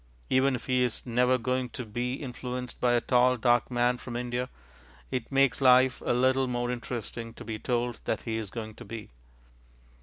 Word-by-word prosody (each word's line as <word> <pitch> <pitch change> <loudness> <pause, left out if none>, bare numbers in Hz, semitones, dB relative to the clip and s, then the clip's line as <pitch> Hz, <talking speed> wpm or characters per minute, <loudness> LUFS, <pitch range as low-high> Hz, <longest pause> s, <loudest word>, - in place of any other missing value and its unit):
Even 130 +1 +4
if 115 -3 -7
he 125 -1 +2
is 125 -3 -2
never 125 +1 +3
going 125 +1 -1
to 125 - -6
be 120 +3 -2
influenced 125 -2 -6
by 125 -1 +3
a 120 - +3
tall 125 +1 +3
dark 120 0 +3
man 120 0 +1
from 120 - -7
India, 125 +1 -2 0.6
it 130 -1 -3
makes 135 0 +3
life 130 0 +5
a - - 0
little 130 +1 +3
more 120 0 -1
interesting 115 -1 -5
to - - -10
be 110 -1 -4
told 120 -1 -1
that 110 - -1
he 110 -1 -2
is 110 -3 -4
going 110 0 -6
to - - -11
be. 105 - -8
125 Hz, 190 wpm, -28 LUFS, 120-125 Hz, 0.6 s, life